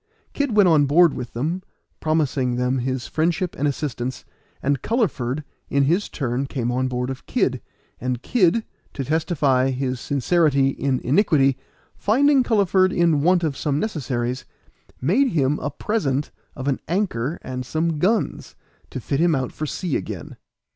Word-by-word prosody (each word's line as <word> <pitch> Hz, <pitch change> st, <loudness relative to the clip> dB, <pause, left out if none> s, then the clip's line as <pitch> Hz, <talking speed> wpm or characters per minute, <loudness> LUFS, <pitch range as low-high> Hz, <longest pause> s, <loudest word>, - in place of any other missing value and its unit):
Kid 280 Hz, -6 st, -1 dB
went 205 Hz, -3 st, +6 dB
on 150 Hz, -4 st, +4 dB
board 165 Hz, +2 st, +5 dB
with 125 Hz, -1 st, -6 dB
them, 160 Hz, +10 st, -2 dB, 0.4 s
promising 145 Hz, -5 st, 0 dB
them 125 Hz, +1 st, 0 dB
his 130 Hz, -1 st, -2 dB
friendship 170 Hz, +3 st, -1 dB
and 145 Hz, -, 0 dB
assistance, 130 Hz, -3 st, -3 dB, 0.4 s
and 140 Hz, -1 st, +1 dB
Culliford 155 Hz, -, -1 dB, 0.3 s
in 140 Hz, 0 st, +2 dB
his 175 Hz, +9 st, +1 dB
turn 130 Hz, -1 st, -2 dB
came 120 Hz, -3 st, -2 dB
on 130 Hz, +1 st, 0 dB
board 125 Hz, 0 st, -2 dB
of 130 Hz, -, -9 dB
Kid; -, -, 0 dB, 0.4 s
and 125 Hz, 0 st, -3 dB
Kid, 220 Hz, -1 st, +2 dB, 0.3 s
to 135 Hz, -, -2 dB
testify 145 Hz, -4 st, +1 dB
his 130 Hz, -1 st, -2 dB
sincerity 140 Hz, 0 st, +2 dB
in 135 Hz, -1 st, -1 dB
iniquity, 140 Hz, -, +3 dB, 0.4 s
finding 275 Hz, +6 st, +3 dB
Culliford 195 Hz, -5 st, +3 dB
in 170 Hz, -5 st, +2 dB
want 180 Hz, +2 st, +3 dB
of 150 Hz, -4 st, 0 dB
some 145 Hz, 0 st, -1 dB
necessaries, 130 Hz, -, -2 dB, 0.6 s
made 205 Hz, -, +3 dB
him 145 Hz, -2 st, +1 dB
a 145 Hz, -, -2 dB
present 150 Hz, -9 st, -1 dB, 0.2 s
of 130 Hz, 0 st, -5 dB
an 135 Hz, -, +1 dB
anchor 170 Hz, -, -1 dB
and 130 Hz, -1 st, -4 dB
some 160 Hz, +3 st, -1 dB
guns, 205 Hz, +5 st, 0 dB, 0.3 s
to -, -, -5 dB
fit 135 Hz, +3 st, -2 dB
him 170 Hz, -1 st, +3 dB
out 130 Hz, -2 st, -2 dB
for 155 Hz, -, -4 dB
the -, -, -4 dB
sea 175 Hz, -7 st, -2 dB
again. -, -, -7 dB
145 Hz, 160 wpm, -22 LUFS, 130-175 Hz, 0.6 s, went